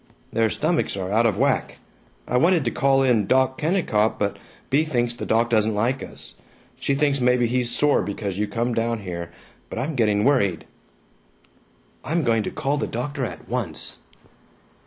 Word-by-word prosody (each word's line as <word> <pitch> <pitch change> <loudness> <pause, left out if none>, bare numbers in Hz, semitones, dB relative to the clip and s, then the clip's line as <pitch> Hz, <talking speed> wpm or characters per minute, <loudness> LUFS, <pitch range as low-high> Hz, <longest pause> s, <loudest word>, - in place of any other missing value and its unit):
"Their 115 -1 +2
stomachs 155 - 0
are 95 0 -3
out 115 +2 +4
of 105 -3 0
whack. 135 +2 0 0.5
I 125 - -1
wanted 165 +2 +3
to 120 - +1
call 135 0 +3
in 115 -6 +2
Doc 130 +2 +2
Kennicott, 150 - +1
but 100 -1 -1 0.3
Bea 145 +4 +4
thinks 120 -6 0
the 120 - -6
doc 115 +1 +2
doesn't 110 -1 +2
like 120 +6 0
us - - -6 0.4
she 140 - 0
thinks 140 -1 +1
maybe 125 0 +3
he's 125 0 0
sore 145 +4 +3
because 100 -1 -4
you 105 - 0
come 115 +4 -1
down 115 -1 -1
here. 85 -3 -6 0.4
But - - -7
I'm 155 +4 -2
getting 105 -5 +2
worried." 100 - +2 1.4
"I'm 165 +3 0
going 115 -3 +2
to - - -3
call 140 +2 -1
the - - -1
doctor 135 +4 -3
at - - -8
once." 110 -11 -4
120 Hz, 175 wpm, -23 LUFS, 110-135 Hz, 1.4 s, out